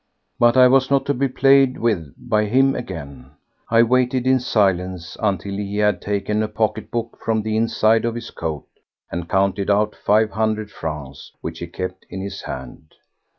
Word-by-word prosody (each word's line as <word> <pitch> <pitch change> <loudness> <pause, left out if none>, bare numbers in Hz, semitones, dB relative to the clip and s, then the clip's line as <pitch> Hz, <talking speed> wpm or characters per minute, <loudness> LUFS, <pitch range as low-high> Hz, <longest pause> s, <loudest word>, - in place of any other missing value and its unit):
But 120 +1 +4
I 130 0 +8
was 130 +1 +3
not 140 -1 +2
to 145 - +1
be 135 +1 0
played 135 0 +4
with 90 -11 -1
by 105 0 0
him 135 +5 +3
again. 70 - -8 0.4
I 115 0 +5
waited 125 +1 +1
in 130 0 +4
silence 95 -7 0
until 100 -2 -1
he 100 0 -4
had 105 0 +2
taken 105 +1 -1
a 110 - 0
pocket 110 0 -2
book 115 -1 -4
from 110 -1 0
the 110 0 -2
inside 110 0 +2
of 115 0 -1
his 120 - -7
coat 80 -3 -5 0.5
and 85 0 -5
counted 95 +1 +1
out 105 +1 +2
five 110 +1 +2
hundred 110 0 -1
francs, 75 -6 -7
which 80 0 -6
he 85 - -5
kept 90 +2 -6
in 95 - -6
his 95 0 -6
hand. 65 +4 -9
105 Hz, 180 wpm, -21 LUFS, 95-120 Hz, 0.5 s, I